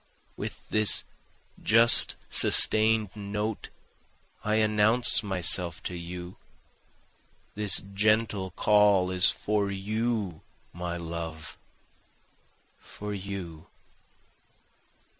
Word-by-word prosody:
With -, -, -7 dB
this 110 Hz, -1 st, +1 dB, 0.6 s
just 115 Hz, +2 st, +4 dB
sustain'd 110 Hz, -2 st, +4 dB
note 105 Hz, +1 st, -5 dB, 0.7 s
I 105 Hz, 0 st, -1 dB
announce 110 Hz, +3 st, +4 dB
myself 90 Hz, -4 st, -1 dB
to 90 Hz, -, -6 dB
you, 90 Hz, +1 st, -9 dB, 1.2 s
This 105 Hz, -1 st, +2 dB
gentle 105 Hz, -1 st, 0 dB
call 100 Hz, -1 st, +2 dB
is 90 Hz, 0 st, +4 dB
for 105 Hz, -1 st, -2 dB
you 105 Hz, -2 st, -4 dB, 0.3 s
my 85 Hz, 0 st, -6 dB
love, 80 Hz, -2 st, -8 dB, 1.2 s
for 105 Hz, 0 st, -9 dB
you. 95 Hz, -5 st, -8 dB
100 Hz, 80 wpm, -26 LUFS, 90-110 Hz, 1.2 s, just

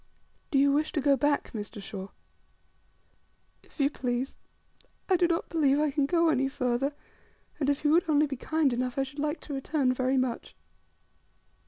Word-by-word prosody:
"Do 275 Hz, -, +1 dB
you 280 Hz, +1 st, +5 dB
wish 300 Hz, +2 st, +1 dB
to -, -, 0 dB
go 280 Hz, 0 st, +4 dB
back, 290 Hz, +2 st, 0 dB
Mr. 210 Hz, 0 st, -6 dB
Shaw?" 195 Hz, -1 st, -6 dB, 1.5 s
"If -, -, -23 dB
you 280 Hz, 0 st, +3 dB
please. 250 Hz, -1 st, -2 dB, 0.7 s
I 380 Hz, -, +4 dB
do 350 Hz, -1 st, +3 dB
not 335 Hz, -1 st, -1 dB
believe 290 Hz, -4 st, +2 dB
I 300 Hz, -1 st, +1 dB
can 275 Hz, -1 st, +1 dB
go 335 Hz, +1 st, +3 dB
any 270 Hz, -3 st, +1 dB
farther; 270 Hz, +1 st, -1 dB, 0.6 s
and 280 Hz, -2 st, +1 dB
if 285 Hz, +1 st, 0 dB
you 295 Hz, -, +3 dB
would 335 Hz, +1 st, +3 dB
only 300 Hz, 0 st, +4 dB
be 275 Hz, -2 st, -4 dB
kind 300 Hz, +1 st, 0 dB
enough, 250 Hz, +1 st, -2 dB
I 270 Hz, -, +2 dB
should 270 Hz, +2 st, -8 dB
like 300 Hz, +2 st, -1 dB
to 295 Hz, -, -7 dB
return 270 Hz, -1 st, 0 dB
very 255 Hz, +1 st, 0 dB
much." 255 Hz, -2 st, -2 dB
280 Hz, 180 wpm, -28 LUFS, 255-300 Hz, 1.5 s, you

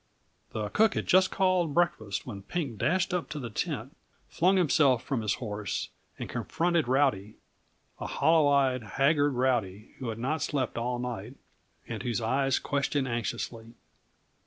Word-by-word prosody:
The 105 Hz, -2 st, -3 dB
cook 220 Hz, -, +3 dB
had -, -, -1 dB
just 185 Hz, +1 st, +5 dB
called 185 Hz, -5 st, +1 dB
breakfast 110 Hz, -, 0 dB
when 105 Hz, -6 st, -7 dB
Pink 130 Hz, -, -4 dB
dashed 175 Hz, +7 st, +1 dB
up 180 Hz, -2 st, -2 dB
to 150 Hz, -, -5 dB
the 120 Hz, -4 st, -6 dB
tent, -, -, -3 dB, 0.3 s
flung 185 Hz, +3 st, +3 dB
himself 145 Hz, -7 st, +3 dB
from 135 Hz, -5 st, -2 dB
his 105 Hz, -3 st, 0 dB
horse, 105 Hz, -4 st, -4 dB, 0.3 s
and -, -, -5 dB
confronted 170 Hz, -4 st, 0 dB
Rowdy 130 Hz, -6 st, +1 dB, 0.6 s
a -, -, -4 dB
hollow 160 Hz, -2 st, +3 dB
eyed, 135 Hz, -3 st, +3 dB
haggard 140 Hz, +6 st, +2 dB
Rowdy 115 Hz, -5 st, -1 dB
who 125 Hz, -, -4 dB
had 110 Hz, -, -4 dB
not 145 Hz, +7 st, -1 dB
slept 135 Hz, -4 st, -1 dB
all 120 Hz, +1 st, -1 dB
night, 120 Hz, -1 st, -5 dB, 0.5 s
and -, -, -5 dB
whose 120 Hz, -2 st, -1 dB
eyes 130 Hz, +4 st, +1 dB
questioned 140 Hz, -1 st, -1 dB
anxiously. 115 Hz, -1 st, -4 dB
130 Hz, 155 wpm, -29 LUFS, 115-155 Hz, 0.6 s, just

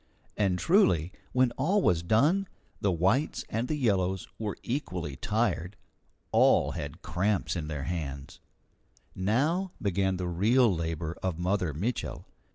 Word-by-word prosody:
And 95 Hz, -4 st, +1 dB
truly, 90 Hz, -, +3 dB, 0.2 s
when 125 Hz, -1 st, +3 dB
all 185 Hz, +10 st, +3 dB
was 85 Hz, -2 st, +3 dB
done, 145 Hz, -, +2 dB, 0.3 s
the 100 Hz, -, +1 dB
whites 95 Hz, -, +1 dB
and 115 Hz, +3 st, -1 dB
the 155 Hz, -, -1 dB
yellows 95 Hz, -8 st, 0 dB
were 105 Hz, -3 st, -3 dB
equally 90 Hz, -, -3 dB
tired. 105 Hz, -, -1 dB, 0.6 s
All -, -, +4 dB
had -, -, -6 dB
cramps 95 Hz, +4 st, 0 dB
in 80 Hz, -3 st, -3 dB
their 75 Hz, -3 st, -4 dB
hands. 75 Hz, +1 st, -5 dB, 0.7 s
Now 150 Hz, -, 0 dB
began 95 Hz, -1 st, 0 dB
the 90 Hz, -1 st, -3 dB
real 110 Hz, +6 st, +3 dB
labour 80 Hz, 0 st, -3 dB
of 90 Hz, -4 st, -2 dB
Mother 90 Hz, -1 st, 0 dB
Mitchel. 100 Hz, -, -3 dB
95 Hz, 135 wpm, -29 LUFS, 85-120 Hz, 0.7 s, All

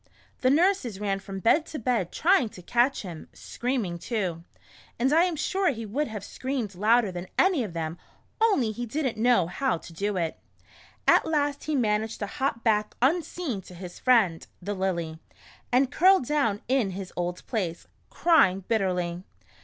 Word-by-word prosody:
The 255 Hz, -, +3 dB
nurses 300 Hz, -, +2 dB
ran 200 Hz, -2 st, -1 dB
from 195 Hz, 0 st, -7 dB
bed 310 Hz, -, +3 dB
to 310 Hz, -, -6 dB
bed 230 Hz, -, 0 dB
tr}ang 330 Hz, -, +3 dB
to 180 Hz, -, -11 dB
catch 245 Hz, +7 st, +1 dB
him, 170 Hz, -5 st, -8 dB
scream 250 Hz, -2 st, -2 dB
ing 170 Hz, -1 st, -5 dB
too, 180 Hz, -6 st, -3 dB, 0.5 s
and 265 Hz, +4 st, +2 dB
I 330 Hz, +3 st, +5 dB
am 355 Hz, -3 st, -1 dB
sure 375 Hz, +5 st, +1 dB
he 230 Hz, -4 st, -4 dB
would 275 Hz, +9 st, -1 dB
have 215 Hz, -3 st, -6 dB
screamed 255 Hz, -3 st, -4 dB
louder 215 Hz, +3 st, +3 dB
than 180 Hz, +1 st, -6 dB
any 365 Hz, -9 st, +3 dB
of 200 Hz, -6 st, -6 dB
them 165 Hz, 0 st, -4 dB, 0.4 s
only 345 Hz, -, +3 dB
he 240 Hz, +3 st, -5 dB
did 290 Hz, +6 st, -2 dB
n't 245 Hz, -, -1 dB
know 240 Hz, -5 st, +4 dB
how 185 Hz, +5 st, -1 dB
to 165 Hz, -, -12 dB
do 200 Hz, +3 st, -2 dB
it. 165 Hz, -2 st, -2 dB, 0.7 s
At -, -, +5 dB
last 290 Hz, -2 st, 0 dB
he 310 Hz, -, -1 dB
managed 220 Hz, -2 st, 0 dB
to -, -, 0 dB
hop 250 Hz, +1 st, -2 dB
back 210 Hz, -2 st, +1 dB
unseen 305 Hz, -, 0 dB
to 180 Hz, -, -13 dB
his 180 Hz, 0 st, -9 dB
friend, 215 Hz, -10 st, +3 dB
the 200 Hz, +3 st, -4 dB
Lily, 170 Hz, -5 st, -2 dB, 0.5 s
and 260 Hz, +2 st, +3 dB
curled 375 Hz, -3 st, +5 dB
down 235 Hz, -8 st, 0 dB
in 255 Hz, -5 st, +2 dB
his 190 Hz, -2 st, -7 dB
old 175 Hz, 0 st, -3 dB
place, 180 Hz, -8 st, -3 dB, 0.2 s
crying 195 Hz, -, +3 dB
bitterly. 180 Hz, -5 st, 0 dB
225 Hz, 175 wpm, -27 LUFS, 185-275 Hz, 0.7 s, I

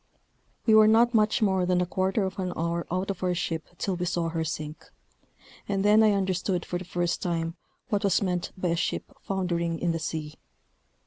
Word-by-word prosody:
We 220 Hz, -, +5 dB
were 215 Hz, 0 st, +8 dB
not 235 Hz, +2 st, +5 dB
much 220 Hz, +2 st, +3 dB
more 190 Hz, -3 st, +2 dB
than 180 Hz, 0 st, +2 dB
a 180 Hz, -, +2 dB
quarter 190 Hz, +3 st, 0 dB
of 190 Hz, 0 st, -4 dB
an 185 Hz, -1 st, -2 dB
hour 170 Hz, +1 st, -2 dB
out 185 Hz, +3 st, -1 dB
of 190 Hz, -, -8 dB
our 180 Hz, -1 st, +1 dB
ship 165 Hz, -2 st, -3 dB
till 195 Hz, -, -1 dB
we 180 Hz, 0 st, -2 dB
saw 170 Hz, -1 st, 0 dB
her 165 Hz, 0 st, -2 dB
sink, 155 Hz, -1 st, -6 dB, 0.8 s
and 195 Hz, 0 st, 0 dB
then 210 Hz, +1 st, +6 dB
I 215 Hz, -1 st, +5 dB
understood 185 Hz, -2 st, 0 dB
for 175 Hz, -, -3 dB
the 180 Hz, -, -8 dB
first 175 Hz, -1 st, -1 dB
time 165 Hz, -1 st, -2 dB, 0.3 s
what 205 Hz, -3 st, 0 dB
was 200 Hz, -3 st, +3 dB
meant 180 Hz, -3 st, -1 dB
by 185 Hz, -1 st, -1 dB
a 170 Hz, -, +2 dB
ship 170 Hz, -, -3 dB
foundering 170 Hz, -3 st, -1 dB
in 175 Hz, +1 st, 0 dB
the 165 Hz, -, -2 dB
sea. 155 Hz, -1 st, -4 dB
180 Hz, 205 wpm, -27 LUFS, 170-195 Hz, 0.8 s, were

